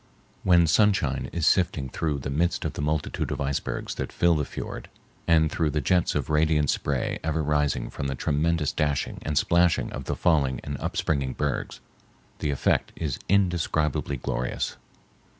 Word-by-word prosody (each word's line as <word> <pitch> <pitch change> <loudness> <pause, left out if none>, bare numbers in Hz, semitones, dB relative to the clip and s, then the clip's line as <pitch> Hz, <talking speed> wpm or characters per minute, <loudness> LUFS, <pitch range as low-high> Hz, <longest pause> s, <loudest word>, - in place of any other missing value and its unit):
When 85 -2 +5
sunshine 80 -7 +2
is 85 -3 -1
sifting 80 -8 +2
through 75 +3 -2
the 70 0 -4
midst 85 +5 0
of - - -2
the - - -5
multitude 75 0 -1
of - - -3
icebergs 70 -1 -2
that - - -4
fill 85 -1 +3
the 75 -3 0
fiord - - -7 0.4
and 80 -2 +4
through 80 -1 +1
the 75 - 0
jets 90 +5 +1
of - - -1
radiant 75 -2 +3
spray - - -1
ever 80 0 0
rising 75 -1 0
from 70 - -4
the 70 - -2
tremendous 75 +2 0
dashing 75 -2 -1
and 75 -1 -2
splashing 85 +2 +2
of 65 - -6
the - - -2
falling 70 -7 +2
and 70 - -4
upspringing 70 -2 -1
bergs, 75 -3 -3 0.6
the 75 - -1
effect 70 - +1
is 75 -5 -3
indescribably 85 -7 +1
glorious. 60 0 -2
75 Hz, 165 wpm, -26 LUFS, 70-85 Hz, 0.6 s, When